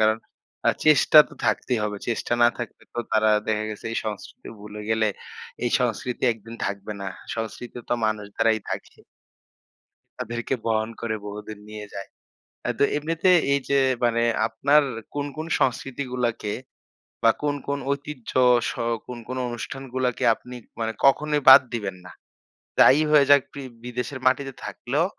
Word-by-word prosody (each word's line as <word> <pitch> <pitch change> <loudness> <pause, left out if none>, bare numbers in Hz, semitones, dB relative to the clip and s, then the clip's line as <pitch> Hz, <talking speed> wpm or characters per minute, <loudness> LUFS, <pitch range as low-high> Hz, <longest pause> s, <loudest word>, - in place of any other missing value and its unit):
কারণ 110 0 +4 0.5
আ - - +6 0.2
চেষ্টা 155 0 +6
তো - - -14
থাকতেই 115 +3 +1
হবে। 105 -1 -3
চেষ্টা 120 0 -2
না - - +8
থাকলে 120 -3 -7
তো - - -5
তারা 110 0 +4 0.2
দেখা 110 -1 0
গেছে 105 - -9
এই - - -2
সংস্কৃতি 105 -2 -7
ভুলে 105 0 -9
গেলে 110 0 +2 0.6
এই 120 - +1
সংস্কৃতি 125 0 -2
একদিন 115 +1 -11
থাকবে 100 +1 -4
না। 100 - -4 0.3
সংস্কৃতি 115 +2 -6
তো - - +2
মানুষ 110 -1 -1
দ্বারাই 115 -1 +3
থাকে। - - -6 1.2
তাদেরকে 120 +1 -3
বহন 110 0 +1
করে 115 -2 -2
বহুদিন 105 +1 -7
নিয়ে 105 -1 -8
যায়। 100 0 -6 0.5
অ্যা - - -1
তো - - +5
এমনিতে 165 +4 +1 0.2
এই 140 - +2
যে 140 - +3 0.3
মানে 115 -1 +2 0.2
আপনার 145 +6 +3 0.3
কোন, 145 0 -2
কোন 155 +1 -4
সংস্কৃতিগুলাকে 125 -4 -1 0.7
বা 115 - +7
কোন, 145 -1 0
কোন 140 0 -1
ঐতিহ্য 140 -3 -5 0.4
স - - -2 0.4
কোন, 125 - -6
কোন 130 +1 -4
অনুষ্ঠানগুলাকে 125 +1 -3
আপনি 125 +2 -11 0.2
মানে 110 0 -1
কখনোই 150 +2 +3
বাদ 130 +1 +11
দিবেন 100 -5 -3
না? - - -10 0.7
যাই 140 - +7
হয়ে 150 -2 +6
যাক 145 -1 +8
প্রি 140 - -8 0.2
বিদেশের 125 +2 -4
মাটিতে 135 +1 +2
থাকলেও 145 +7 -1
120 Hz, 150 wpm, -24 LUFS, 110-135 Hz, 1.2 s, বাদ